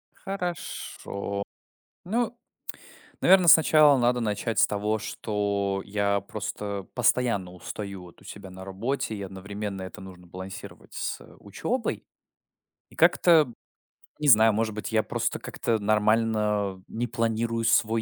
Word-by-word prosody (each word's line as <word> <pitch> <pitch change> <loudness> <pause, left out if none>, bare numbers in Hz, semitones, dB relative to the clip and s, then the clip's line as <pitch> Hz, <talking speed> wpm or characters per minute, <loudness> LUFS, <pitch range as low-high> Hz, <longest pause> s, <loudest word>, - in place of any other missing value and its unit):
Хорошо. 175 - -5 0.6
Ну, 235 +5 -1 0.8
наверно, 185 -2 +6
сначала 155 -2 +7
надо 125 0 +2
начать 110 0 -2
с - - +6
того, 105 +1 -1
что 100 -2 -2
я 100 0 0
просто 100 -1 -5
постоянно 115 -7 +1
устаю 100 +1 -7
вот 90 -1 -15
у - - -19
себя 100 -1 -10
на 95 0 -10
работе, 110 +6 -3
и 100 - -6
одновременно 100 +1 -6
это 95 - -8
нужно 90 -2 -12
балансировать 95 +2 -9
с, - - -3
э, - - -16
учёбой. 225 - -3 0.9
И - - -18
как-то, 175 - +4
м, 125 -6 -4 0.6
не 150 - -1
знаю, 110 -2 +7
может 110 0 0
быть, 105 +1 -5
я 110 -1 +2
просто - - -2
как-то 115 - -1
нормально 105 -2 +1
не 120 +2 -3
планирую 115 -1 -1
свой 115 0 +3
105 Hz, 135 wpm, -26 LUFS, 100-115 Hz, 0.9 s, сначала